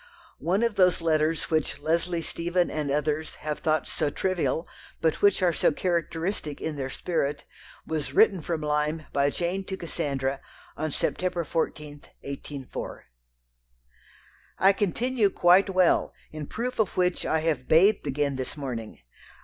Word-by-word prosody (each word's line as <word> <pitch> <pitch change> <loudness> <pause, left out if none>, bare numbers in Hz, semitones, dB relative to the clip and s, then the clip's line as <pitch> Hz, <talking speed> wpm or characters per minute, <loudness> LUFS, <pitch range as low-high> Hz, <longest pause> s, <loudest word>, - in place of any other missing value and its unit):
One 190 +6 +1
of 230 -3 0
those 180 -2 +4
letters 160 -1 +1
which 155 -2 +1
Leslie 165 +3 0
Stephen 175 +2 0
and 150 -2 -2
others 150 +2 -1
have 150 -1 -2
thought 155 -1 +1
so 145 - -1
"trivial," 175 0 -1 0.3
but 160 -1 +1
which 200 -2 +4
are 175 -2 +4
so - - +3
characteristic 170 -1 -2
in 160 -1 -3
their 135 -2 -3
spirit, 145 -2 -2 0.4
was 150 -5 -3
written 195 +3 +4
from 160 0 -3
Lyme 150 +1 0
by 140 0 +3
Jane 175 +5 -2
to 190 -1 -5
Cassandra, 140 -5 -2 0.3
on 155 - -2
September 180 +4 -1
14, 150 -2 -3 0.2
1804 140 -1 -7 1.5
"I 195 +2 +5
continue 215 +3 +1
quite 185 +2 +5
well; 185 -2 +3 0.2
in 155 -2 -6
proof 245 +2 -4
of 215 -5 0
which 180 -1 +1
I 160 - +1
have 150 -6 -1
bathed 185 +2 +4
again 140 0 0
this 130 +3 -4
morning..... 120 -6 -5
160 Hz, 145 wpm, -27 LUFS, 150-180 Hz, 1.5 s, I